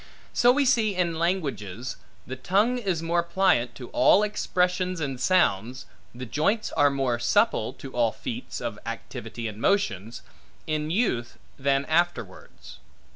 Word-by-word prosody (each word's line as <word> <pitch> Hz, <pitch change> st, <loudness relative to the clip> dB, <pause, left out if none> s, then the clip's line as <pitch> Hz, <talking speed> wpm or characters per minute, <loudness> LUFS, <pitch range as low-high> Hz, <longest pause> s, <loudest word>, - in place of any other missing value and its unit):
So 245 Hz, 0 st, +5 dB
we 280 Hz, +2 st, +2 dB
see, 225 Hz, -6 st, +2 dB
in 170 Hz, -3 st, 0 dB
languages, 130 Hz, -, -2 dB, 0.3 s
the 130 Hz, -, -6 dB
tongue 205 Hz, -, +1 dB
is 185 Hz, -7 st, -2 dB
more 170 Hz, +1 st, +1 dB
pliant 170 Hz, -8 st, +1 dB
to 125 Hz, -, -9 dB
all 185 Hz, +11 st, +4 dB
expressions 180 Hz, -3 st, 0 dB
and 135 Hz, -4 st, -4 dB
sounds, 130 Hz, -, +1 dB, 0.3 s
the 125 Hz, +1 st, -6 dB
joints 180 Hz, -, 0 dB
are 145 Hz, 0 st, +4 dB
more 135 Hz, -4 st, -1 dB
supple, -, -, +2 dB
to 135 Hz, -, -10 dB
all 120 Hz, -3 st, +1 dB
feats 245 Hz, -, -6 dB
of 115 Hz, -3 st, -4 dB
activity 115 Hz, 0 st, -6 dB
and 105 Hz, 0 st, -8 dB
motions, 115 Hz, -, 0 dB, 0.4 s
in 155 Hz, 0 st, -2 dB
youth 160 Hz, -, -1 dB, 0.2 s
than 135 Hz, +1 st, +1 dB
afterwards. 175 Hz, +2 st, -2 dB
155 Hz, 140 wpm, -26 LUFS, 120-185 Hz, 0.4 s, So